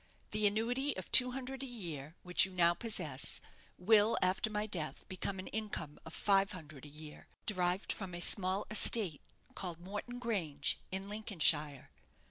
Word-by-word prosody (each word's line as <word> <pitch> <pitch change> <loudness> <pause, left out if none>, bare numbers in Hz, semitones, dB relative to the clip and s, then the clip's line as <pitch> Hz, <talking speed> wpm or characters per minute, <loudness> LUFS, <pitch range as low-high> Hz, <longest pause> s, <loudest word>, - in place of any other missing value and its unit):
The 210 0 +2
annuity 240 +7 -1
of 185 - -8
two 250 -1 +9
hundred 265 +1 -6
a 270 - -4
year 165 - -6
which 180 -1 +5
you 190 - -2
now 175 -2 +3
possess 175 - -1 0.4
will, 215 +3 +4
after 185 +4 +1
my 210 0 -2
death, 170 -7 -4
become 190 0 -4
an 185 - -7
income 205 -9 -6
of 160 - -7
five 195 0 +2
hundred 150 -6 -10
a - - -11
year, 150 +1 -12 0.2
derived 180 -1 0
from 185 -4 -7
a - - -6
small 190 +2 +3
estate 210 -7 +4 0.3
called 175 -3 -6
Morton 205 +7 -7
Grange, 180 - -1
in 190 +1 -4
Lincolnshire. 155 - 0
190 Hz, 160 wpm, -34 LUFS, 170-215 Hz, 0.4 s, two